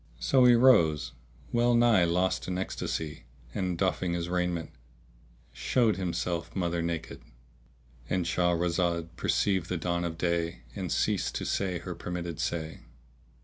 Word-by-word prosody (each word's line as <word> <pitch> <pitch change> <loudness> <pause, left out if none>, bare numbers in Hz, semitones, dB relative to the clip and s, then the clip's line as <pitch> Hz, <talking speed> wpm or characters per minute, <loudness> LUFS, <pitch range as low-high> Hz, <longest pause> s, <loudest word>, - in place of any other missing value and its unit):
So 130 - +4
he 120 -1 +7
rose, 105 - +4 0.4
well 120 0 +3
nigh 115 -6 +5
lost 90 +2 0
in 90 -1 -2
ecstasy 80 -6 -4 0.3
and, 90 -2 -2
doffing 95 -1 0
his 85 0 -2
raiment, 90 -2 -1 0.8
showed 115 -5 +1
himself 85 -2 -3
mother 85 -2 0
naked.—And 65 -1 -6
Shahrazad 85 0 +1
perceived 95 -5 0
the 90 - -1
dawn 85 +1 -1
of 85 -1 -3
day 85 -4 -1
and - - -4
ceased - - 0
to - - -3
say 95 -3 -1
her 90 +1 -6
permitted 85 -1 -5
say. 80 -2 -3
85 Hz, 130 wpm, -29 LUFS, 85-95 Hz, 0.8 s, he